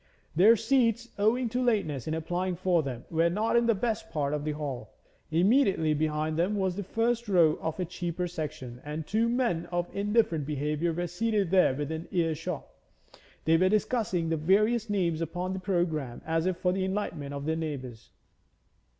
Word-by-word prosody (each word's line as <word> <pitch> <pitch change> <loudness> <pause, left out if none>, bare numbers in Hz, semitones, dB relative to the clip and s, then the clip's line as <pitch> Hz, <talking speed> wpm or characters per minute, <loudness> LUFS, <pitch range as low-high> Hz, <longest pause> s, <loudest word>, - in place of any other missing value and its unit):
Their 205 +8 +7
seats, 235 0 +1
owing 235 +4 +2
to 245 +3 -1
lateness 195 - 0
in 155 - -1
applying 175 +3 -2
for 180 -1 +2
them, 130 -4 -6
were 165 +1 +3
not 215 +6 0
in 235 0 +4
the 230 - +4
best 220 +2 -2
part 145 -2 -1
of 150 -1 -2
the 155 - -1
hall; 145 -4 -6 0.3
immediately 185 - +3
behind 155 +1 -1
them 185 +5 +1
was 190 -3 0
the 205 - -3
first 230 +4 -1
row 165 -5 +4
of 160 +3 -3
a 180 - 0
cheaper 175 0 -3
section, 140 -7 -6
and 150 +1 -5
two 225 +5 +1
men 235 -9 0
of 175 0 -3
indifferent 200 -7 +1
behaviour 150 +3 -1
were 175 +2 -2
seated 195 +1 0
there 185 -8 +4
within 160 +3 -4
ear 165 -3 +1
shot; 165 0 -5 0.8
they 165 +1 +5
were 185 +2 +3
discussing 210 -5 0
the 165 - +1
various 210 +8 +2
names 175 -5 0
upon 175 +3 -3
the 190 - -3
programme 170 -9 -1
as 165 +2 0
if 185 -2 0
for 180 0 +1
the 190 0 -1
enlightenment 170 -8 -3
of 140 0 -5
their 160 +1 0
neighbours. 135 -8 -5
175 Hz, 185 wpm, -28 LUFS, 155-205 Hz, 0.8 s, Their